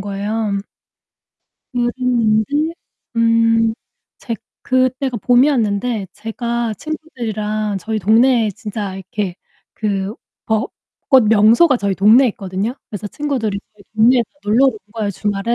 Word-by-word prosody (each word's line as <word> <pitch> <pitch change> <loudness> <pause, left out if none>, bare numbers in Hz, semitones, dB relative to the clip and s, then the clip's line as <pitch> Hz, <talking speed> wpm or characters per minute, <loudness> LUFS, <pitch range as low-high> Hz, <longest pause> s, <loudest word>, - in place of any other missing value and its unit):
거예요. 205 +1 -2 1.1
그랬는데 245 +4 +1 0.4
음 230 -1 +3 0.5
제 235 - -3 0.3
그때가 255 0 0
봄이었는데 240 -4 +2
제가 235 0 -3
친구들이랑 215 -9 -3
저희 220 +3 -3
동네에 225 +2 +4
진짜 205 -1 -5
이렇게 190 -1 -4 0.4
그 200 -2 -2 0.3
벚꽃 235 +3 +1
명소가 225 +8 +5
저희 200 -4 -1
동네에 220 +8 +6
있거든요. 195 +4 -4 0.2
그래서 205 -1 -5
친구들이 245 -5 -2 0.2
저희 205 - -18
동네에 235 +3 +5
다 - - -55 0.2
놀러 220 +6 +3
온 240 -5 0
거예요, 215 -3 -2
주말에. 205 +3 -1
225 Hz, 275 characters per minute, -18 LUFS, 205-245 Hz, 1.1 s, 동네에